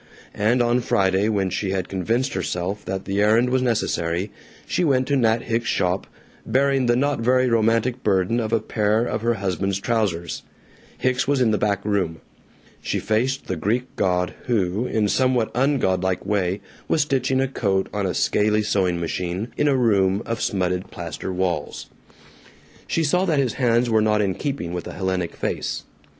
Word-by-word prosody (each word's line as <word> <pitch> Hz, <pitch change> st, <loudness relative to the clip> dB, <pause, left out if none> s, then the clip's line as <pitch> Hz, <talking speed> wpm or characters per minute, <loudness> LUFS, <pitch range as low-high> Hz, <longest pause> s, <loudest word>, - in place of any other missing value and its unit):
And 120 Hz, +4 st, +2 dB
on 120 Hz, +1 st, +2 dB
Friday, 95 Hz, -1 st, +2 dB
when 100 Hz, -3 st, 0 dB
she 100 Hz, -, -2 dB
had 95 Hz, -1 st, -1 dB
convinced 115 Hz, +8 st, -1 dB
herself 95 Hz, +2 st, -3 dB
that 95 Hz, 0 st, -4 dB
the 100 Hz, +1 st, 0 dB
errand 115 Hz, +4 st, +3 dB
was 130 Hz, 0 st, +2 dB
necessary, 100 Hz, -6 st, -1 dB, 0.3 s
she -, -, 0 dB
went 130 Hz, -5 st, +2 dB
to 140 Hz, -, +3 dB
Nat 115 Hz, -3 st, +2 dB
Hicks's 115 Hz, 0 st, -1 dB
shop, 90 Hz, +1 st, 0 dB, 0.4 s
bearing 135 Hz, -1 st, +2 dB
the 120 Hz, -, +4 dB
not 140 Hz, +2 st, +1 dB
very 125 Hz, +2 st, +3 dB
romantic 115 Hz, +2 st, +1 dB
burden 100 Hz, +3 st, +1 dB
of 110 Hz, -2 st, -2 dB
a 115 Hz, -, +3 dB
pair 110 Hz, +1 st, +1 dB
of 110 Hz, -, -2 dB
her 120 Hz, +1 st, +1 dB
husband's 95 Hz, -1 st, -1 dB
trousers. 100 Hz, -7 st, -1 dB, 0.6 s
Hicks 130 Hz, +1 st, 0 dB
was 140 Hz, -1 st, +2 dB
in 120 Hz, -3 st, +3 dB
the 105 Hz, -, +1 dB
back 100 Hz, -1 st, 0 dB
room. 95 Hz, -6 st, 0 dB, 0.6 s
She -, -, -2 dB
faced 125 Hz, +5 st, 0 dB
the 95 Hz, -, -2 dB
Greek 115 Hz, +10 st, -2 dB
god 90 Hz, -1 st, 0 dB
who, 105 Hz, 0 st, 0 dB
in 110 Hz, -1 st, +1 dB
a -, -, 0 dB
somewhat 130 Hz, -2 st, +1 dB
ungodlike 95 Hz, -10 st, +1 dB
way, 100 Hz, -2 st, 0 dB, 0.3 s
was 155 Hz, -, +2 dB
stitching 135 Hz, -2 st, 0 dB
a 135 Hz, -, +2 dB
coat 100 Hz, -7 st, 0 dB
on 100 Hz, -2 st, -1 dB
a 90 Hz, -, -2 dB
scaley 105 Hz, +1 st, +2 dB
sewing 90 Hz, -4 st, +1 dB
machine, 90 Hz, +5 st, -3 dB
in 150 Hz, -, +1 dB
a 140 Hz, -2 st, +3 dB
room 100 Hz, -4 st, +2 dB
of 115 Hz, -1 st, -3 dB
smutted 90 Hz, -2 st, -1 dB
plaster -, -, -6 dB
walls. 90 Hz, -5 st, -3 dB, 1.0 s
She 165 Hz, -, 0 dB
saw 180 Hz, +5 st, +2 dB
that 160 Hz, -5 st, +1 dB
his 135 Hz, -4 st, +1 dB
hands 120 Hz, 0 st, +3 dB
were 110 Hz, -2 st, +3 dB
not 105 Hz, 0 st, +2 dB
in 100 Hz, -2 st, +1 dB
keeping 115 Hz, -, -4 dB
with 90 Hz, -, -4 dB
a -, -, -7 dB
Hellenic 95 Hz, -2 st, -2 dB
face. -, -, -3 dB
110 Hz, 180 wpm, -23 LUFS, 95-125 Hz, 1.0 s, the